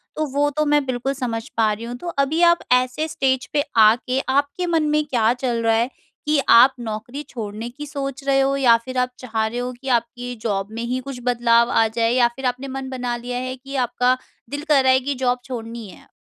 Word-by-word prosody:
तो 310 - -1
वो 290 +1 +2
तो 305 - +2
मैं 295 -1 +3
बिल्कुल 255 +1 -2
समझ 230 -4 -4
पा 220 -2 +3
रही 215 +2 -7
हूँ। 240 +1 -5
तो 345 - -9 0.2
अभी 310 +5 -1
आप 340 - +3
ऐसे 255 +5 +1
स्टेज 270 -4 0
पे 290 - +2 0.2
आके 250 +4 +2 0.2
आपके 285 +5 0
मन 320 - +3
में 300 0 +2
क्या 235 -5 +2
चल 245 -2 -2
रहा 225 0 +3
हैं 235 +2 +1 0.4
कि 300 0 +2
आप 250 +3 +8
नौकरी 235 +5 -5
छोड़ने 220 0 -6
की 290 +5 -8
सोच 275 -2 -5
रहे 270 -1 +3
हो 270 0 +2
या 245 -4 +6
फिर 260 0 -5
आप 250 0 +1
चाह 225 -3 -2
रहे 230 +3 -3
हो 250 0 -3
कि 270 - -9
आपकी 245 +1 -4
ज़ॉब 195 -3 -1
में 230 +1 -5
ही 250 +2 -2
कुछ 270 -3 -6
बदलाव 235 -1 +3
आ 225 - +3
जाए 230 0 +2
या 245 -1 +4
फिर 265 - -6
आपने 260 +2 -9
मन 270 0 -5
बना 250 -2 -3
लिया 245 +1 -5
हैं 255 +1 -4
कि 275 +1 -7
आपका 250 +1 +1 0.3
दिल 285 +2 -5
कह 295 -2 +6
रहा 260 -1 +4
हैं 260 0 +3
कि 285 0 -1
ज़ॉब 250 -1 0
छोड़नी 230 -3 -6
हैं? - - -15
250 Hz, 235 wpm, -21 LUFS, 235-275 Hz, 0.4 s, आप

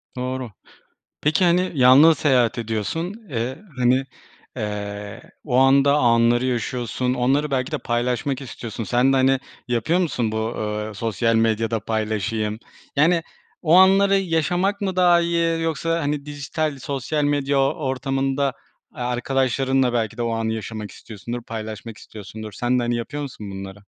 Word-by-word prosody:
Doğru. 125 -1 -4 0.7
Peki, 155 +5 +2
hani, 180 +2 +2
yalnız 140 +4 +7
seyahat 125 -6 +2
ediyorsun. 115 - -3 0.2
Eee, 125 +1 -3 0.2
hani, 125 +1 +3 0.5
eee, 105 -2 -5 0.2
o 125 -4 0
anda 135 +2 +5
anları 120 -1 +3
yaşıyorsun. 125 0 -1
Onları 135 +4 +1
belki 130 0 -1
de 155 - 0
paylaşmak 125 +2 -1
istiyorsun. 115 -3 -6
Sen 125 +4 +2
de, 135 - +3
hani, 135 0 +3 0.3
yapıyor 120 +9 +1
musun 125 -11 0
bu, 110 +1 -2
eee, 105 0 -3
sosyal 115 +2 0
medyada 115 0 +1
paylaşayım? 110 0 -2 0.4
Yani, 165 +4 +4 0.4
o 165 -1 +4
anları 195 +2 +6
yaşamak 180 +3 0
mı 190 -2 -1
daha 175 -2 +5
iyi 170 -1 0
yoksa, 165 +1 -1
hani, 145 -1 -2
dijital 145 +1 -3
sosyal 140 +2 -2
medya 145 -1 +1
o 135 0 +2
ortamında, 135 -1 -1 0.4
aaa, 125 -4 -4
arkadaşlarınla 130 +1 +1
belki 115 -2 -1
de - - -3
o 115 -1 -1
anı 115 0 -1
yaşamak 110 -2 -6
istiyorsundur, 120 +3 -7
paylaşmak 110 0 -7
istiyorsundur. 110 +1 -9
Sen 120 +5 0
de, - - -1
hani, 120 0 0
yapıyor 145 +5 -4
musun 110 -7 -8
bunları? 95 +1 -8
125 Hz, 145 wpm, -22 LUFS, 115-145 Hz, 0.7 s, yalnız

